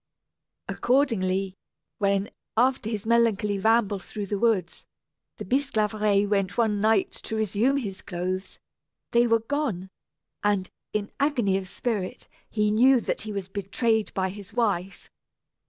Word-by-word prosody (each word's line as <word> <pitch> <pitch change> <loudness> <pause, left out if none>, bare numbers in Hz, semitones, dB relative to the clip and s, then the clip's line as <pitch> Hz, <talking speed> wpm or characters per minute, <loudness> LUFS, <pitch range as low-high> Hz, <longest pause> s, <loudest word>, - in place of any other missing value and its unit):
Accordingly, 195 -8 +1 0.5
when, 200 0 +1 0.3
after 250 -2 +2
his 215 -2 -3
melancholy 220 -3 +2
ramble 220 -1 +3
through 205 +3 -6
the 200 0 -2
woods, 205 -7 0 0.5
the - - -6
Bisclaveret 215 -6 +1
went 200 -2 0
one 215 -3 +2
night 220 -2 +3
to 220 - -6
resume 220 +5 +1
his 195 -8 -4
clothes, 185 +1 -4 0.5
they 240 0 +4
were 230 -1 +3
gone; 225 -8 -2 0.5
and, 205 -3 +1 0.2
in 210 -1 -2
agony 255 -9 +2
of 185 -1 -9
spirit, 205 -3 -3 0.2
he 210 -1 +1
knew 250 +4 +5
that - - -2
he 215 - -5
was 200 -2 -4
betrayed 210 +3 0
by 190 -1 0
his 200 0 -10
wife. 195 -6 -1
210 Hz, 135 wpm, -26 LUFS, 195-230 Hz, 0.5 s, knew